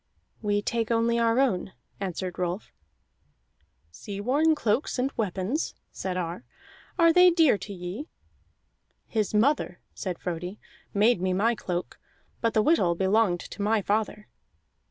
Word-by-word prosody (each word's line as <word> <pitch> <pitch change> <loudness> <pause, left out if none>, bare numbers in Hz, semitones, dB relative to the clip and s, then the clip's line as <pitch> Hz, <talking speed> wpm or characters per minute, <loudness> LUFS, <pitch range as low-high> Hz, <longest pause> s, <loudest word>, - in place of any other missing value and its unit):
"We 205 -1 0
take 230 -1 -1
only 235 0 +2
our 230 0 +2
own," 195 -8 +1 0.3
answered 185 -2 -4
Rolf. 180 +3 -3 1.2
"Sea 200 - -7
worn 290 +9 +3
cloaks 240 +1 0
and 260 +2 0
weapons," 205 - -2 0.2
said 185 -1 -4
Ar, 175 0 -4 0.5
"are 335 -2 +6
they 360 +1 +8
dear 330 -8 +4
to 205 - -7
ye?" 190 - -6 1.0
"His 215 -2 -1
mother," 225 -5 +2
said 180 -3 -4
Frodi, 180 +3 -5 0.3
"made 210 -1 +3
me 185 0 +1
my 220 +6 +2
cloak, 180 -5 -4 0.4
but 230 -1 0
the 215 - +4
whittle 200 - +3
belonged 190 -1 +2
to - - -8
my 210 0 +2
father." 210 +1 -1
210 Hz, 135 wpm, -27 LUFS, 185-235 Hz, 1.2 s, they